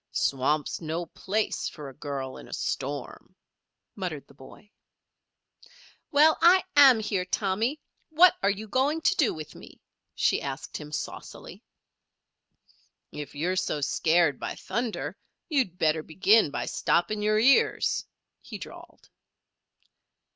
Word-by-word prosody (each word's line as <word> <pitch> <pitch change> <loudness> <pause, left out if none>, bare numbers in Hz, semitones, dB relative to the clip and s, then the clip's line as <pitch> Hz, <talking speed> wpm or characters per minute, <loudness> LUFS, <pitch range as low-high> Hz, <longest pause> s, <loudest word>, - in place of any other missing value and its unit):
"Swamp's 140 +4 0
no 165 +2 -3
place 205 +6 -2
for 150 -3 -10
a 135 - -10
girl 135 -1 -5
in - - -11
a - - -10
storm," 140 -1 -5 0.6
muttered 175 -7 -5
the - - -18
boy. 140 +9 -16 1.4
"Well, 305 +2 +5
I 355 +3 +6
am 270 -5 +8
here, 205 -4 -1
Tommy; 210 +9 -1 0.3
what 340 +3 +6
are 195 - +2
you 205 +2 -3
going 275 +8 0
to 365 - +2
do 295 -9 +2
with 155 -1 -8
me?" - - -14 0.4
she - - +1
asked 135 -1 -6
him, 150 -1 -10
saucily. 150 -1 -7 1.5
"If 150 -1 -8
you're 175 +6 -1
so 170 -4 -1
scared 160 +1 +2
by - - -5
thunder 235 -2 -4 0.3
you'd 260 - 0
better 155 -1 +1
begin 195 +5 +3
by 145 - -4
stopping 210 +5 0
your 215 0 +2
ears," 255 +5 +3 0.4
he - - -9
drawled. - - -12
185 Hz, 130 wpm, -27 LUFS, 150-230 Hz, 1.5 s, am